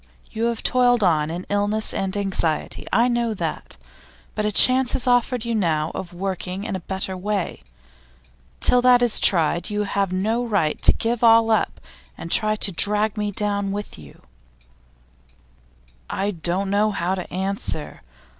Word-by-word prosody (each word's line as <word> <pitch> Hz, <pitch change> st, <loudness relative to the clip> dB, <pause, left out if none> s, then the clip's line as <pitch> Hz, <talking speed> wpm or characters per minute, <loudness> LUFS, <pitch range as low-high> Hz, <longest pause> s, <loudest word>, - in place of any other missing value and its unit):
You 225 Hz, +1 st, -2 dB
have 235 Hz, -1 st, -2 dB
toiled 245 Hz, -2 st, +3 dB
on 155 Hz, -4 st, +2 dB
in 175 Hz, +3 st, -5 dB
illness 205 Hz, +2 st, -1 dB
and 195 Hz, +1 st, -2 dB
anxiety 190 Hz, -6 st, -2 dB
I 235 Hz, +2 st, +3 dB
know 235 Hz, -2 st, 0 dB
that. -, -, -5 dB, 0.6 s
But 215 Hz, -, -2 dB
a -, -, 0 dB
chance 255 Hz, +4 st, +4 dB
is 250 Hz, -, -3 dB
offered 245 Hz, -1 st, +1 dB
you 235 Hz, -, -2 dB
now 165 Hz, -7 st, 0 dB
of 180 Hz, -, -6 dB
working 185 Hz, +1 st, -4 dB
in 200 Hz, -, -3 dB
a -, -, -3 dB
better 190 Hz, +1 st, -4 dB
way. 195 Hz, -, -3 dB, 1.0 s
Till 250 Hz, -, +3 dB
that 245 Hz, -1 st, +5 dB
is 240 Hz, -3 st, +2 dB
tried, 170 Hz, -1 st, +2 dB
you 210 Hz, 0 st, -1 dB
have 200 Hz, -2 st, -1 dB
no 220 Hz, +6 st, 0 dB
right 200 Hz, -10 st, -1 dB
to -, -, +6 dB
give 235 Hz, +1 st, -2 dB
all 225 Hz, -1 st, +5 dB
up 220 Hz, -, 0 dB, 0.4 s
and 170 Hz, -, -8 dB
try 215 Hz, -1 st, +3 dB
to 205 Hz, -, -1 dB
drag 210 Hz, +4 st, +1 dB
me 210 Hz, -1 st, -2 dB
down 200 Hz, -1 st, -2 dB
with 205 Hz, -, -6 dB
you.' 70 Hz, -3 st, -15 dB, 1.9 s
'I 200 Hz, +1 st, -1 dB
don't 185 Hz, +2 st, -2 dB
know 210 Hz, +2 st, +2 dB
how 185 Hz, -3 st, -2 dB
to 185 Hz, -2 st, -6 dB
answer. 190 Hz, -4 st, -4 dB
205 Hz, 165 wpm, -22 LUFS, 185-225 Hz, 1.9 s, to